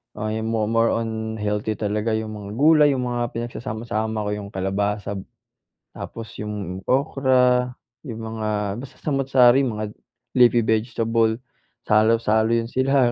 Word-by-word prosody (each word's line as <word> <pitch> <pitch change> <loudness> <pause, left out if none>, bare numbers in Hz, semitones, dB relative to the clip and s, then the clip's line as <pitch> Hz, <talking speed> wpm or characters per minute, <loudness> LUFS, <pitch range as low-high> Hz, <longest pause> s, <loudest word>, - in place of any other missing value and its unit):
Ah, 110 +1 -3
'yong 110 0 -2
mo 115 -1 0
more 115 +1 +2
on 110 -1 -3
healthy 105 0 -2
talaga, 105 +1 -1
'yong 110 0 -3
mga 105 -1 -8
gulay, 150 +2 +6
'yong 125 - -2
mga 120 -1 -2
pinagsasama-sama 110 -2 -3
ko, 105 - -2
'yong 105 -1 -5
kalabasa, 100 +1 -2 0.7
tapos 115 -2 -8
'yong 100 -3 -5
okra, 125 -2 +2 0.3
'yong 115 -4 -6
mga 110 -1 -4 0.3
basta, 135 -1 -11
samu't-sari, 135 -3 +4
mga 110 -3 -2 0.5
leafy 120 -2 +5
vegetable, 115 0 +1 0.5
salo-salo 110 +1 +3
'yon 115 0 -1
sila. 130 0 +2
110 Hz, 135 wpm, -23 LUFS, 105-125 Hz, 0.7 s, gulay